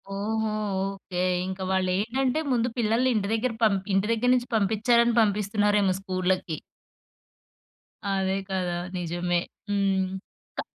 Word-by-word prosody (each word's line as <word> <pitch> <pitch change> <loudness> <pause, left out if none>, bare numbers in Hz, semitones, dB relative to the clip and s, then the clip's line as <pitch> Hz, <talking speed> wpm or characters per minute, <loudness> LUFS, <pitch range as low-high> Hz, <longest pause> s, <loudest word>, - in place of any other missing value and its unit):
ఓహో! 220 +2 -1 0.4
ఓకే. 185 -2 -4 0.2
ఇంక 190 0 -5
వాళ్ళు 190 -1 +1
ఏంటంటే 255 +7 0
ముందు 240 -1 +2
పిల్లల్ని 235 +2 +2
ఇంటి 200 -2 0
దగ్గర 225 +2 0
పం 215 -3 +5 0.2
ఇంటి 195 +2 +2
దగ్గర 235 +2 +1
నుంచి 245 0 -1
పంపించారని 230 +3 +3
పంపిస్తున్నారేమో 205 -1 +2
స్కూల్‌లకి. 185 -3 -1 1.5
అదే 190 -1 +1
కదా! 185 -2 -1 0.2
నిజమే. 175 0 -1 0.3
హ్మ్. 195 -2 +1 0.5
క - - 0
200 Hz, 115 wpm, -26 LUFS, 190-225 Hz, 1.5 s, పం